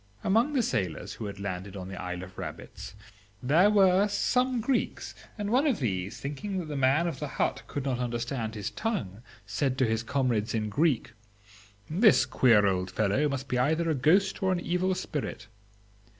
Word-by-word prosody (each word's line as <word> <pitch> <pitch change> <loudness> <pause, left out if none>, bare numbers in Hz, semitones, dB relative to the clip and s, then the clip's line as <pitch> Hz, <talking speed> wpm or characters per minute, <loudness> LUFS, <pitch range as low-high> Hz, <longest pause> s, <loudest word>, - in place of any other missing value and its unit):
"Among 230 +9 +2
the 260 -4 +2
sailors 90 - -2
who 110 - -7
had 100 -1 -6
landed 100 0 -5
on 90 -1 -6
the 95 - -7
Isle 90 0 -5
of 95 0 -11
Rabbits - - -8 0.5
there 165 +10 +5
were 195 -1 +4
some 250 +4 +1
Greeks, 245 +3 -1 0.2
and 205 -1 -3
one 265 +5 +3
of 265 - +2
these, 100 -5 -2
thinking 150 +8 -4
that 180 - -3
the 150 - -4
man 135 +5 +3
of 170 - -3
the 150 - -3
hut - - -1
could 140 -2 -4
not 130 -3 -1
understand 120 -1 -3
his 105 -1 -4
tongue, 115 - -3 0.2
said 135 -3 -1
to 130 - +3
his 110 0 0
comrades 120 -4 0
in 110 -1 -1
Greek, 140 -1 +1 0.7
'This 200 +7 +5
queer 115 -5 +4
old 95 -1 0
fellow 110 +10 +1
must 135 -1 -4
be 125 -2 0
either 160 +5 +1
a - - +2
ghost 180 +8 +2
or 190 -1 +2
an 180 - +1
evil 180 +2 0
spirit. 150 - -4
135 Hz, 185 wpm, -28 LUFS, -, 0.7 s, there